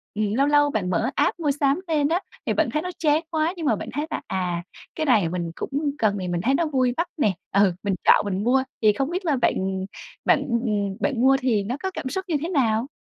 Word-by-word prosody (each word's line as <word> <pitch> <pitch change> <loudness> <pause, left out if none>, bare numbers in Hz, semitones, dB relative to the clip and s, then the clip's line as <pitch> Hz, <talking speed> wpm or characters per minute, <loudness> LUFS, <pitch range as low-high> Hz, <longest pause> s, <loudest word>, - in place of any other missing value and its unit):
ừm, 210 -1 0
lâu 275 +5 +2
lâu 290 0 +4
bạn 200 -9 -1
mở 175 - +1
app - - +1
mua 295 -3 +1
sắm 280 +2 +1
lên 300 -3 +2
á 345 +3 +1 0.2
thì - - +1
bạn - - +1
thấy 305 - +1
nó 360 - -4
chán 305 0 +3
quá 320 +2 0
nhưng 325 - -4
mà 230 - +3
bạn 215 - -7
thấy 295 +3 -2
là - - -3
à, 180 -2 -2 0.3
cái 315 - -1
này 210 - +3
mình 170 -1 -3
cũng - - -5 0.3
cần 205 -5 +1
thì 185 - -4
mình 175 -1 -1
thấy 260 +8 +2
nó 330 +4 +2
vui 255 -4 +1
mắt 335 +2 0
nè, 215 -9 +2 0.2
ừ, 195 -2 +4
mình 200 -2 0
chọn - - +5
mình 200 0 -2
mua, 260 +2 +3 0.2
thì 210 -1 +5
không 275 +7 -1
biết 365 +2 -3
là 305 -4 +2
bạn 190 -6 0 0.4
bạn, - - +4
ừm, 210 -5 -1
bạn 245 -4 0
mua 270 +1 +5
thì 230 -6 +1
nó 240 +7 -3
có 380 - -1
cảm 260 - -5
xúc 380 +7 -3
như 335 - 0
thế 330 - -3
nào? 245 -7 +1
255 Hz, 260 wpm, -24 LUFS, 200-300 Hz, 0.4 s, chọn